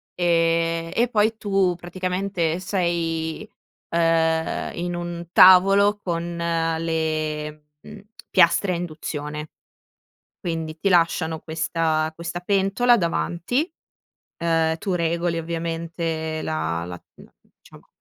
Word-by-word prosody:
e 165 -1 +1
e 240 +1 +2
poi 220 0 +2
tu 195 -4 +1
praticamente 180 -1 -2
sei, 170 -2 -1 0.4
ehm, 165 -1 +1
in 175 0 -3
un 175 -1 -5
tavolo 195 +3 +7
con 170 -1 -3
le, 160 -2 -2 0.2
mhmm, 215 -1 -11 0.3
piastre 185 +2 +4
a - - 0
induzione, 155 -3 -5 0.9
quindi 160 -2 -4
ti 195 - +1
lasciano 165 -2 +2
questa 160 0 -1
questa 170 +1 -5
pentola 195 +6 +3
davanti, 190 - -1 0.7
ehm, 165 -1 +1
tu 195 - -4
regoli 170 0 0
ovviamente 165 -1 -3
la 85 - -2
la 90 0 -8
la - - -17 0.3
diciamo, - - -18
170 Hz, 105 wpm, -23 LUFS, 160-180 Hz, 0.9 s, tavolo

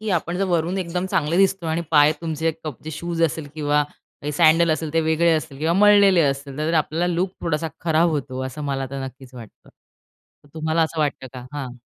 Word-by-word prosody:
की 215 -1 -3
आपण 170 +2 -3
जर 195 - 0
वरून 175 +1 0
एकदम 180 +1 -2
चांगले 155 +2 0
दिसतो 195 -2 +2
आणि 160 +1 -1
पाय 150 0 +6
तुमचे 160 -1 -1
कपचे 155 +1 -7
शूज 165 +2 -3
असेल 160 -2 0
किंवा 150 -1 +1 0.5
सॅडल 165 +1 +4
असेल 155 0 -2
ते 165 - +2
वेगळे 160 +1 +2
असतील 150 -3 -6
किंवा 160 +2 +1
मळलेले 200 -2 +6
असतील, 140 -1 -1
तर 155 +2 -1
आपल्याला 160 +2 +1
लूक 180 +2 0
थोडासा 160 -1 -1 0.2
खराब 165 +1 +3
होतो. 135 -3 -3
असं 150 +3 -7
मला 135 -1 -2
आता 135 +1 -5
नक्कीच 130 0 -11
वाटतं. 115 -4 -13 0.8
तर - - -20
तुम्हाला 160 +1 0
असं 160 0 -3
वाटतं 145 -3 -1
का? 125 -1 -9
हां. 130 -4 -6
160 Hz, 195 wpm, -22 LUFS, 145-170 Hz, 0.8 s, पाय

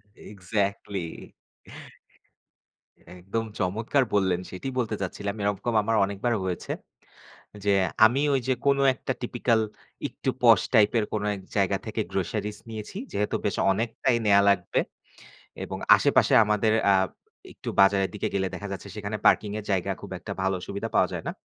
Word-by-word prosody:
Exactly. 100 -2 -4 1.9
একদম 105 +6 -3
চমৎকার 110 +9 +1
বললেন 95 -3 +2
সেটাই 110 +9 -5
বলতে 110 -3 -1
চাচ্ছিলাম। 100 +2 -4
এরকম 105 +3 -1
আমার 115 +1 0
অনেকবার 100 +5 -2
হয়েছে। 90 -2 -4 0.9
যে 100 - +4 0.3
আমি 130 +5 +3
ঐ - - +4
যে 130 - +2
কোন 140 0 +4 0.2
একটা 130 - -4
typical 120 -1 +1 0.5
একটু 130 - -4
posh 115 -5 +6
type 105 -1 +5
এর 105 - 0
কোন 105 -1 -1
এক 95 - -9 0.2
জায়গা - - +2
থেকে - - -2
groceries 105 0 -2
নিয়েছি। 110 - -7
যেহেতু 105 +1 -1
বেশ 100 - 0 0.2
অনেকটাই 115 +4 0
নেয়া 100 -1 +6
লাগবে 95 -3 +1 0.9
এবং - - -6 0.2
আশেপাশে - - +3
আমাদের 105 +1 +2 0.2
আ - - +5 0.6
একটু - - -9
বাজারের 95 0 +4
দিকে 105 - -2
গেলে 95 -1 0
দেখা 100 +2 -6
যাচ্ছে 100 +1 -7
সেখানে 105 +1 -4
parking 105 -1 +4
এর 105 - -7
জায়গা 95 -2 0
খুব - - -10
একটা - - -7
ভালো 95 0 +1
সুবিধা 100 0 -4
পাওয়া - - +4
যায় - - -5
না। - - -2
105 Hz, 150 wpm, -26 LUFS, 95-115 Hz, 1.9 s, posh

